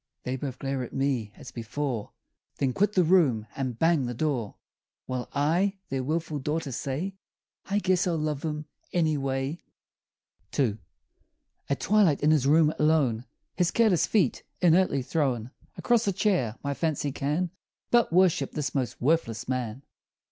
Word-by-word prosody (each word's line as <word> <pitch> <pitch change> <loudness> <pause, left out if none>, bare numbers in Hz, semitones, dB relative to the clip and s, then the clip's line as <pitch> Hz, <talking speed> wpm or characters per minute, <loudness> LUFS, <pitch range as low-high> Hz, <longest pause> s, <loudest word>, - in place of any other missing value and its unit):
They 125 - -2
both 130 -1 -5
glare 135 0 -2
at 125 - -7
me 135 -6 0
as - - -11
before 120 0 -4 0.4
Then 130 -2 0
quit 205 +6 +2
the 185 - +4
room 155 - +3
and 130 -4 -3
bang 160 -4 +2
the 120 - -4
door, 125 -7 -1 0.5
While 125 -1 -4
I, 175 +8 +1
their 135 -1 -2
willful 155 +1 -2
daughter, 150 +1 -2
say, 140 +10 -3 0.5
"I 200 - 0
guess 185 -3 +2
I'll 170 -2 +1
love 150 -2 -2
him, 150 -1 -3 0.3
anyway!" 145 -2 0 1.0
II. 115 -7 +1 0.9
At 140 - -1
twilight, 195 -8 +3
in 150 - +5
his 145 -4 +3
room, 155 +1 +5
alone, 145 -7 +2 0.3
His 175 -1 +2
careless 215 -4 +3
feet 185 - +2 0.2
inertly 175 -6 +3
thrown 130 -5 -1 0.3
Across 235 -3 +2
a 200 - +2
chair, 180 - +1
my 140 0 -1
fancy 145 -2 -1
can 150 +6 -1 0.4
But 240 -6 +4
worship 175 -6 +3
this 150 -2 -2
most 130 -4 -2
worthless 125 -6 0
man! 125 0 -3
145 Hz, 150 wpm, -27 LUFS, 130-170 Hz, 1.0 s, in